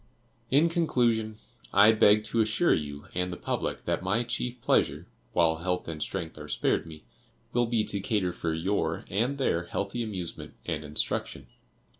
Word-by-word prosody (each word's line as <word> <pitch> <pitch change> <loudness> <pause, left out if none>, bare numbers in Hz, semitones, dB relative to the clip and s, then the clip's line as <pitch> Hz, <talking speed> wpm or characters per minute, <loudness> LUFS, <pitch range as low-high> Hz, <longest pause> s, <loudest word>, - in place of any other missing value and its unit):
"In 145 +5 +5
conclusion, 120 -10 +1 0.3
I 100 +3 +7
beg 105 -1 +5
to 115 +1 +1
assure 110 +11 +3
you 75 -2 -3
and 90 0 -1
the 90 - -5
public - - -3
that - - 0
my 100 +6 +1
chief 120 +1 -2
pleasure, - - +1 0.3
while 80 -1 +3
health 90 +2 -2
and 80 -2 -5
strength 80 -4 -4
are 75 - -8
spared 80 - 0
me, 80 -1 -11 0.5
will 120 -1 +2
be 115 -2 +1
to 100 - -1
cater 95 -3 0
for 80 - -2
your 80 0 -1
and 120 +9 0
their 90 -10 0
healthy 100 +6 -3
amusement 95 -7 -5
and 80 -2 -2
instruction. 75 0 -2
100 Hz, 165 wpm, -28 LUFS, 85-115 Hz, 0.5 s, I